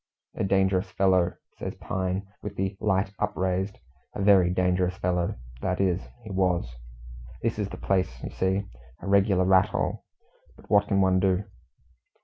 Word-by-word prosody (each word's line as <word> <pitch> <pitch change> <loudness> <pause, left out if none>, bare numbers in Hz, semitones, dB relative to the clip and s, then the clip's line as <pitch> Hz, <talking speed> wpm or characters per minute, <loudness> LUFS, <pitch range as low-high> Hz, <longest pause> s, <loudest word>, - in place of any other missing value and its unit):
"A - - -2
dangerous 95 0 +2
fellow," 95 -2 +2 0.3
says - - -4
Pine, 95 +1 -2 0.2
with 105 -1 -6
the 95 +1 -2
light 95 -2 +1
upraised. 95 -1 -1 0.4
"A - - -3
very 95 -3 +6
dangerous 90 0 +1
fellow 90 -1 0 0.3
that 90 -1 -1
is, 95 -1 +2 0.2
he 110 - -8
was. 90 -10 0 0.7
This 115 -1 -1
is 100 -1 -1
the - - -7
place, 95 -2 +1
you - - -5
see 95 +1 0 0.4
a - - -8
regular 100 -1 +3
rat 95 0 +5
hole; - - -2 0.5
but - - -18
what 100 -1 +5
can 100 -1 +2
one 95 -1 +4
do?" 95 +1 +2
95 Hz, 155 wpm, -27 LUFS, 90-100 Hz, 0.7 s, very